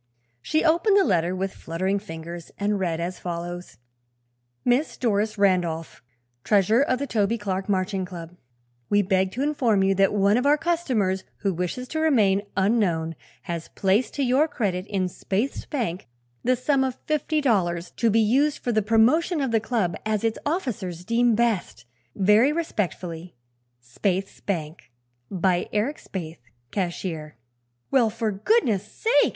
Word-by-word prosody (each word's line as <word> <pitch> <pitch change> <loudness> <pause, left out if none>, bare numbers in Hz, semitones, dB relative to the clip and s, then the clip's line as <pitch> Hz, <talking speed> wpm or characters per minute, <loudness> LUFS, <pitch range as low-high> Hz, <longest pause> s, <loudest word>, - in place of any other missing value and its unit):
She 310 - 0
opened 345 +6 +4
the 395 - +5
letter 180 - +1
with 195 +1 -2
fluttering 185 +5 -2
fingers 170 -3 -8
and 205 0 0
read 170 -3 -1
as 175 +2 -4
follows: 175 - -6 0.9
"Miss 250 +5 +1
Doris 215 -3 0
Randolph, 175 -5 0 0.4
Treasurer 210 +4 +3
of 255 -2 +2
the 280 - -3
Toby 225 -3 0
Clark 195 -2 -3
Marching 190 0 0
Club: 175 -2 -8 0.5
"We 205 0 +3
beg 190 0 +1
to 260 - -2
inform 245 -9 +2
you 195 0 +3
that 195 0 +3
one 205 +1 +3
of 250 +3 +1
our 295 +1 +5
customers, 255 - 0 0.2
who 195 -2 0
wishes 180 +9 -3
to 315 - -2
remain 215 -11 +3 0.2
unknown, 190 -6 +1 0.3
has 170 -2 -5
placed 200 +6 +1
to 280 - 0
your 265 +5 +3
credit 200 - -2
in 195 -3 -1
Spaythe's 200 +7 -3
Bank 220 - -3 0.4
the 255 +1 +3
sum 265 +2 +1
of 260 -1 -2
Fifty 305 0 0
Dollars, 180 - 0
to 230 - +3
be 225 +1 +4
used 275 +7 +2
for 245 - -2
the 215 -1 +2
promotion 240 - +3
of 270 -4 -1
the 225 - +3
Club 215 -7 -1
as 215 -1 -1
its 225 -1 0
officers 195 - -3
deem 235 +1 +3
best. 215 - -1 0.3
Very 210 +8 +4
respectfully, 180 - -3 0.4
Spaythe's 185 - -2
Bank, 160 -7 -4 0.4
by 180 -1 0
Eric 230 +8 0
Spaythe, 165 -4 -7 0.3
Cashier." 170 - -4 0.5
"Well, 245 -5 +4
for 225 0 -2
goodness 215 - +2
sake!" 465 +2 +3
205 Hz, 155 wpm, -25 LUFS, 180-245 Hz, 0.9 s, the